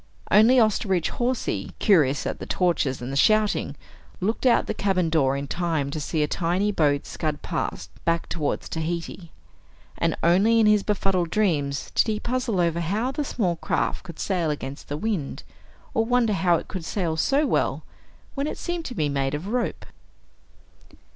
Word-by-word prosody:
Only 220 +5 +6
Osterbridge 200 -5 +2
Hawsey, 250 +1 -2
curious 150 - +3
at - - -3
the - - -7
torches 150 -8 0
and 125 - -4
the - - -3
shouting, 215 +8 +2 0.4
looked 220 +7 0
out 245 - +4
the - - -2
cabin 185 -4 0
door 140 -4 +2
in 140 - -4
time 160 -4 -1
to 155 - -3
see 150 +1 -1
a - - 0
tiny 180 +6 0
boat 145 -6 +1
scud 155 -2 -3
past, 85 - -3
back 165 0 0
toward 155 -4 -2
Tahiti. 165 +1 -5 0.7
And - - +1
only 200 +7 +4
in 220 - +5
his 210 -1 +5
befuddled 195 -4 0
dreams 150 -9 0
did - - +2
he 215 -1 -1
puzzle 240 -5 -1
over 170 -1 +1
how 205 +10 -1
the 295 - -2
small 190 -11 -1
craft - - -1
could 170 -3 -10
sail 180 -5 -1
against 140 -2 -5
the 145 - -2
wind, 185 -6 -3 0.5
or 225 - +2
wonder 235 -2 +2
how 185 -2 +3
it - - -3
could 185 -3 -6
sail 170 -2 -2
so 275 - +2
well, - - 0 0.5
when 280 +1 -2
it - - -4
seemed 345 -2 -4
to 250 - -6
be 155 -6 +1
made 140 0 -1
of 165 +7 -5
rope. 245 +1 -2
180 Hz, 175 wpm, -25 LUFS, 155-215 Hz, 0.7 s, Only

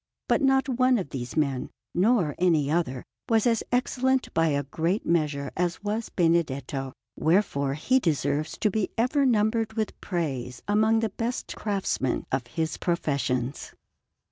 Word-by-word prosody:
But - - +2
not 270 -1 +3
one 255 -1 +3
of 185 -9 -4
these 125 0 -5
men, 140 -4 0 0.2
nor 185 -4 +2
any 160 -5 +3
other, 135 -7 -1 0.2
was 225 -2 +3
as 230 -2 +3
excellent 260 +1 +1
by 165 0 +3
a 140 -2 +1
great 165 - -1
measure 150 -5 0
as 180 +2 -1
was 215 +2 -2
Benedetto; 145 -6 0 0.2
wherefore 155 -6 +1
he 255 - +2
deserves 155 - -1
to 210 - +3
be 215 0 0
ever 270 +4 +2
numbered 220 -1 +1
with 220 -1 -3
praise 135 -9 -3
among 220 +2 +3
the 225 - 0
best 230 +5 -4
craftsmen 195 - -1
of 130 -2 -1
his 160 +5 -2
professions. 135 -6 -1
170 Hz, 145 wpm, -26 LUFS, 140-225 Hz, 0.2 s, not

